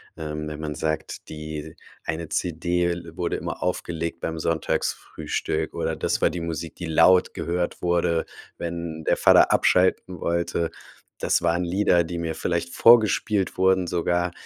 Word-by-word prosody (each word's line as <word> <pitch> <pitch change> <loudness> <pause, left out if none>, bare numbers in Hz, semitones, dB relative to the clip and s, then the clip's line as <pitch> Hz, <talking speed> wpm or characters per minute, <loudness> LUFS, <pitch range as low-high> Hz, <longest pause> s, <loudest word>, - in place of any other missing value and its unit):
Ähm, 75 -1 -5
wenn 75 0 -6
man 75 -1 -4
sagt, 80 0 -3
die 75 0 -7 0.3
eine 80 0 -4
CD 85 0 0
l 85 -1 -7
wurde 85 - -1
immer - - -5
aufgelegt 85 -2 -3
beim 80 -1 -3
Sonntagsfrühstück 80 0 -2
oder - - -2
das - - -1
war - - +4
die 90 - -4
Musik, 85 -3 -5
die 85 - -6
laut 85 +3 +4
gehört 85 +1 -2
wurde, 85 -1 +1 0.3
wenn 85 -2 -5
der - - +2
Vater - - +6
abschalten 90 -1 +2
wollte. 85 0 -1 0.5
Das - - +2
waren 85 +2 +1
Lieder, 90 -2 +2
die 85 +1 -5
mir 85 -1 -2
vielleicht 85 +1 -2
vorgespielt 110 -4 +4
wurden 95 -1 +3
sogar. 90 0 0
85 Hz, 150 wpm, -24 LUFS, 80-90 Hz, 0.5 s, Vater